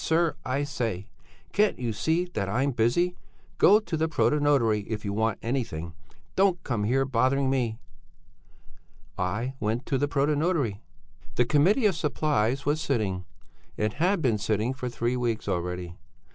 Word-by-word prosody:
sir, 165 0 +2
I 135 +3 -1
say! 115 -9 -3 0.5
Can't 210 0 +3
you 120 -3 -2
see 160 +11 +1
that 100 -1 -2
I'm 130 +7 +1
busy. 130 +10 +1 0.4
Go 205 +3 +7
to 195 - -4
the 160 +1 0
protonotary 140 -10 +2
if 105 -2 -4
you 100 - -2
want 110 0 0
anything! 100 -10 -3 0.4
Don't 190 -3 +2
come 115 -6 -1
here 135 +4 +2
bothering 130 +1 +2
me!' 120 -5 0 1.4
"I 105 +8 -2
went 110 +4 -1
to 135 - 0
the 145 - +1
protonotary. 145 - +1 0.6
"The 125 - +3
Committee 175 - +3
of 200 -4 +3
Supplies 145 -4 0
was 150 +2 +1
sitting; 100 - -1 0.5
it 105 0 0
had 180 -1 +2
been 115 -5 +2
sitting 110 +4 0
for 130 -1 -4
three 120 +1 -1
weeks 120 -4 -2
already. 90 -2 -3
125 Hz, 150 wpm, -27 LUFS, 110-150 Hz, 1.4 s, Go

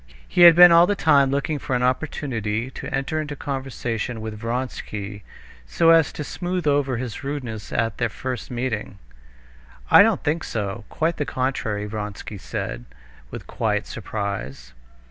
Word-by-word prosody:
He - - 0
had 170 -1 +10
been 175 0 +9
all 170 +1 +7
the 205 - +1
time 145 -7 +4
looking 140 +2 -1
for 130 - -2
an 125 - 0
opportunity 125 -4 -2
to - - -7
enter 140 +4 -1
into 150 -1 -5
conversation 125 -4 -4
with 110 0 -5
Vronsky, 110 -4 -4 0.5
so 165 - +4
as 165 -3 +5
to 150 - -5
smooth 180 +3 -3
over 140 -3 +1
his 120 +1 -5
rudeness 130 -7 -5
at 115 -2 -1
their 115 -2 +1
first 125 +4 -5
meeting. 120 -5 -3 0.9
"I - - +10
don't 215 -2 +3
think 160 +2 0
so, 105 0 -4
quite 165 +1 -1
the 150 - -1
contrary," 130 -6 -2
Vronsky 105 -1 -6
said, - - -5 0.4
with - - -8
quiet - - -1
surprise. 70 - -5
130 Hz, 155 wpm, -23 LUFS, 110-150 Hz, 0.9 s, had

